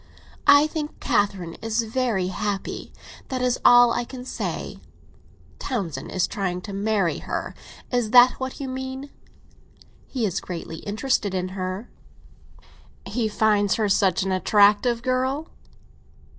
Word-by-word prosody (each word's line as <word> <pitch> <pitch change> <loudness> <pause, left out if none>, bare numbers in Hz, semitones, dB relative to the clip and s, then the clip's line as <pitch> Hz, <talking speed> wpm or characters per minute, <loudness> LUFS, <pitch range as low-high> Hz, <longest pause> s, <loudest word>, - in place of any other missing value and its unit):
"I 285 +1 +8
think 310 -1 -5
Catherine 195 -5 0
is 225 +1 0
very 225 -5 -1
happy; 200 0 -4 0.4
that 255 -2 -3
is 250 -1 +1
all 245 -1 +7
I 240 - -1
can 250 +1 -9
say." - - -4 0.8
"Townsend 175 - -4
is 185 - +1
trying 180 -3 -3
to 200 +1 -8
marry 200 -3 0
her—is 245 -3 -4
that 245 +2 +8
what 260 0 -5
you 275 - -4
mean?" 265 +2 -6 1.0
"He 250 -4 -2
is 190 - -1
greatly 165 -2 -6
interested 205 0 -1
in 185 0 -2
her." 185 +4 -4 1.2
"He 235 -3 -1
finds 205 -2 +2
her 215 -2 +1
such 195 -2 +2
an 190 - -2
attractive 210 +5 +3
girl?" 260 +4 -1
220 Hz, 130 wpm, -24 LUFS, 195-255 Hz, 1.2 s, I